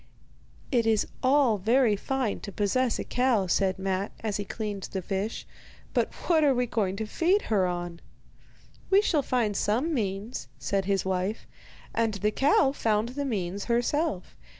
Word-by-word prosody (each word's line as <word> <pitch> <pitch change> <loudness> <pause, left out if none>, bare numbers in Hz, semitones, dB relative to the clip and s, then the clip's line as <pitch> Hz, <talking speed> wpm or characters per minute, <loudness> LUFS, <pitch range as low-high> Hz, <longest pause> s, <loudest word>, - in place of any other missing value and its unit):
'It 235 -4 +2
is 220 -2 +3 0.2
all 260 -5 +3
very 225 +2 +3
fine 255 +1 -2
to 200 - -7
possess 225 +5 +1
a - - -3
cow,' 250 -6 +1
said 190 +1 +1
Matte, 190 +1 -2
as 215 -3 -1
he 205 - -3
cleaned 205 -2 -5
the 190 - -2
fish; 200 +4 -3 0.5
'but - - +1
what 320 -3 +4
are 280 -3 +4
we 245 0 +1
going 205 -5 -1
to 220 +2 -3
feed 355 - +2
her 190 -3 +3
on?' 175 -1 -4 0.9
'We 395 +2 +5
shall 315 -8 +2
find 235 -6 0
some 245 +12 +1
means,' 210 -1 -3
said 195 -1 -1
his 195 -2 0
wife; 190 +3 -2 0.5
and 225 -2 +1
the 210 +2 0
cow 270 +2 +3
found 220 -4 0
the 285 +3 -3
means 200 -5 -2
herself. 240 - 0
215 Hz, 165 wpm, -27 LUFS, 195-255 Hz, 0.9 s, We